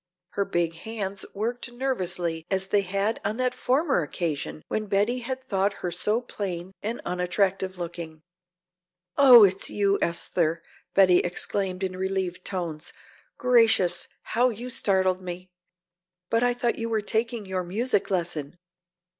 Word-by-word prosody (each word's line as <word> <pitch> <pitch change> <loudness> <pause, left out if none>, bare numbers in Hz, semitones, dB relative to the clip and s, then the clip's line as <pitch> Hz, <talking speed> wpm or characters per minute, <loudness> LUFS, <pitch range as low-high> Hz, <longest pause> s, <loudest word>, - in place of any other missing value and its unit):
Her 200 - -1
big 175 -4 0
hands 200 -1 -4
worked 235 +4 -3
nervously 180 -10 -2
as 190 -1 +1
they 205 - +3
had 200 +3 -1
on 215 - -1
that 255 -1 +1
former 270 - +1
occasion 155 -1 -3
when 215 -1 -2
Betty 205 +6 +1
had 260 +2 -5
thought 200 -4 0
her 175 - -1
so 210 +7 0
plain 190 -6 -5
and 225 +3 -3
unattractive 185 +1 0
looking. 170 -2 -6 0.9
"Oh, 255 -5 +9
it's 190 -1 +3
you, 200 -1 +1
Esther," 170 -1 0 0.3
Betty 185 -2 +6
exclaimed 185 +1 -2
in 185 -1 -2
relieved 190 -1 -2
tones. 170 -5 -4 0.4
"Gracious, 225 -8 +3 0.2
how 245 +3 +2
you 245 +2 -6
startled 190 -5 +2
me! 180 0 -7 0.8
But 230 - +3
I 245 0 +2
thought 240 -1 -1
you 230 0 -2
were 220 -1 +1
taking 225 +1 -1
your 190 -1 -2
music 205 +5 0
lesson. 170 -4 -2
195 Hz, 140 wpm, -26 LUFS, 180-230 Hz, 0.9 s, Oh